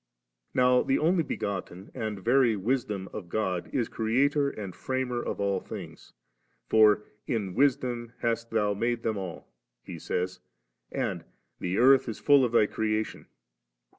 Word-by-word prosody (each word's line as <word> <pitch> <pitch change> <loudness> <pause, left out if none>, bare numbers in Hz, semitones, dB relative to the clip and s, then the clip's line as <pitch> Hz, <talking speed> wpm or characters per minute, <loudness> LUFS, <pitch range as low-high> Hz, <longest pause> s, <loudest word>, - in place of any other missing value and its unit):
Now 125 0 +5
the 135 - +1
Only 170 +3 +3
begotten 95 - -5
and 110 -6 -4
very 120 -2 +4
Wis 120 +6 0
dom" 100 -2 -5
of 90 -5 -7
God 95 -3 -2
is 120 -4 0
Creator 140 +6 +1
and 100 -8 -7
Framer 130 -2 -2
of - - -4
all 100 -1 +1
things; - - -10 0.5
for 105 -1 +5 0.2
*in 105 -7 -2
Wisdom 125 -2 +1
hast 115 0 -1
Thou 105 -2 +1
made 115 +3 -1
them 110 -2 -1
all',' 95 -3 -7 0.4
he - - -8
says, 90 +1 -2 0.5
and - - -2 0.2
* - - -49
the 90 +2 -2
earth 130 0 +5
is 110 - -5
full 140 -2 +5
of 120 - +1
Thy 110 - +5
creation.' 110 0 -2
115 Hz, 155 wpm, -28 LUFS, 100-125 Hz, 0.5 s, Now